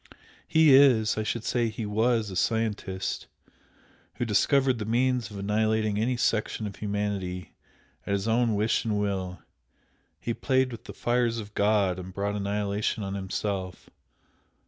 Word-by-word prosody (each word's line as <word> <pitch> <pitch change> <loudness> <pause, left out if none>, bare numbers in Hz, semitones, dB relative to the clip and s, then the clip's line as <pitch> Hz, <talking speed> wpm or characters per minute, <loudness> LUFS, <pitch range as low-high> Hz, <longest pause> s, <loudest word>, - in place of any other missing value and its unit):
He 160 -3 +5
is 130 -6 +6
I 110 - -1
should 110 +1 -2
say 120 -1 0
he 110 0 -5
was 110 0 +1
a - - -6
scientist, 105 -1 -1 0.9
who 120 - -2
discovered 130 +4 +2
the - - -2
means 120 0 +1
of 105 - -9
annihilating 110 +1 0
any 120 +3 0
section 110 -1 0
of 100 - -6
humanity 100 -3 -3 0.5
at 100 - 0
his 100 +2 -1
own 115 -1 +2
wish 105 +2 +1
and 105 -2 0
will 95 -3 -3 0.8
he 115 - -2
played 130 +1 +1
with 115 +1 -9
the - - -8
fires 120 -1 0
of 105 -2 -7
God 100 -3 +2
and 90 0 -9
brought 100 +1 -1
annihilation 105 +1 -1
on 95 0 -4
himself. 95 -1 -4
105 Hz, 150 wpm, -27 LUFS, 100-115 Hz, 0.9 s, is